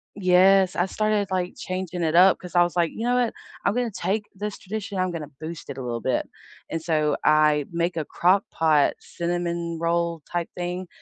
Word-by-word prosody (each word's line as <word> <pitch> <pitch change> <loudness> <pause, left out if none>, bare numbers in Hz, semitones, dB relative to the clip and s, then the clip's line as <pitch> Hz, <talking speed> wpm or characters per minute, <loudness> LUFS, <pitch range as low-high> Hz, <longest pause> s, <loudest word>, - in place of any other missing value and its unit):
Yes. 190 0 +4
I 175 - +1
started, 215 0 0
like, 185 -1 -1
changing 185 -4 -4
it 160 0 +1
up, 185 +2 +7
'cause 180 - -11
I 175 - +7
was 175 0 -2
like, 170 -2 +2
"You 225 - -5
know 245 +1 +2
what, 245 -2 +1 0.3
I'm 200 - +2
gonna 245 0 0
take 205 +2 -2
this 205 +1 -5
tradition, 200 0 -5
I'm 185 0 0
gonna 155 -4 -6
boost 160 +1 -7
it - - -6
a - - -5
little 120 -2 -3
bit," 130 - -1 0.4
and 165 - -3
so 155 -3 +1
I 150 -1 +4
make 170 +1 -1
a 160 - -1
Crock-Pot 165 -4 +2
cinnamon 170 -1 -3
roll 170 0 0
type 175 -1 -2
thing, 180 +1 -4
175 Hz, 195 wpm, -24 LUFS, 165-190 Hz, 0.4 s, up